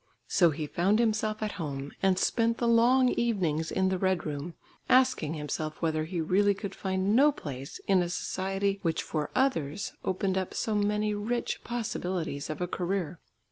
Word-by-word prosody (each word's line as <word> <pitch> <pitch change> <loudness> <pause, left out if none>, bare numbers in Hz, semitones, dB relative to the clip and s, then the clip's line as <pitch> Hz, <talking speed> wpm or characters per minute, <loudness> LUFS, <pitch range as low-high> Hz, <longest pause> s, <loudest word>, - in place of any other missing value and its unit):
So 175 -3 +4
he 155 0 -3
found 185 +7 +2
himself 215 -1 0
at 210 - -1
home, 140 -2 -4
and 190 -1 +3
spent 230 +3 +1
the 235 - 0
long 245 +3 +5
evenings 175 -11 0
in 190 0 +2
the 190 -1 -1
"Red 185 -1 +1
Room," 150 +2 -4 0.3
asking 255 - +3
himself 155 +1 -4
whether 155 -2 0
he 175 +1 -4
really 200 +5 +3
could 200 -1 -6
find 190 +2 0
no 290 +4 +6
place 140 - -7
in 190 -2 +4
a 175 - -1
society 195 +2 -1
which 165 -2 0
for 150 -2 -3
others 200 - 0
opened 190 0 0
up 185 - -5
so 220 - -1
many 210 +1 +1
rich 225 +4 -2
possibilities 180 -10 -3
of 155 - -4
a 180 - 0
career. 180 -2 -2
190 Hz, 175 wpm, -29 LUFS, 160-215 Hz, 0.3 s, no